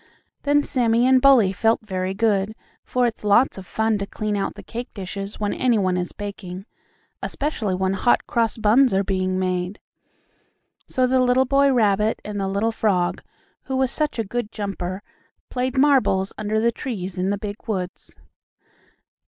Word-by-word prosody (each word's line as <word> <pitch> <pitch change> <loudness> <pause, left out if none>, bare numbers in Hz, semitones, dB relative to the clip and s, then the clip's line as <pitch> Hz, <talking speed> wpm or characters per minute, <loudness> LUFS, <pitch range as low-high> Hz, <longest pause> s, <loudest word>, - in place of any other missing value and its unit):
Then 290 0 +3
Sammie 240 -3 +2
and 260 0 +5
Bully 245 -9 +6
felt 225 +4 +2
very 185 -1 -3
good, 210 -1 +1 0.3
for 250 -1 0
it's 230 -2 -3
lots 210 +2 +3
of 185 - -11
fun 220 -1 0
to 200 - -3
clean 210 0 -3
out 195 - -2
the - - -10
cake 240 +2 -6
dishes 195 +1 -6
when 205 -1 -1
any 245 -3 +2
one 185 -3 +1
is 180 -1 -2
baking, 195 -2 -7 0.6
especially 240 -10 -2
when 190 +1 0
Hot 240 +5 +2
Cross 230 -2 0
Buns 225 +1 +4
are 195 - +2
being 185 -1 -1
made. 185 +1 -2 1.1
So 255 -1 +1
the 255 0 +3
little 255 +1 +3
boy 275 +1 +3
rabbit 215 -3 +2
and 205 -1 -4
the 195 - -1
little 200 +4 0
frog, 190 -6 0 0.4
who 265 - -3
was 260 -1 +1
such 305 -2 -2
a 225 - 0
good 220 +1 -4
jumper, 195 -2 -4 0.5
played 255 +1 -2
marbles 260 -9 +3
under 215 +1 -1
the 235 +1 +2
trees 195 -7 -5
in 185 +1 0
the 200 - 0
big 205 +2 -7
woods. 185 -4 -4
210 Hz, 170 wpm, -22 LUFS, 195-245 Hz, 1.1 s, Bully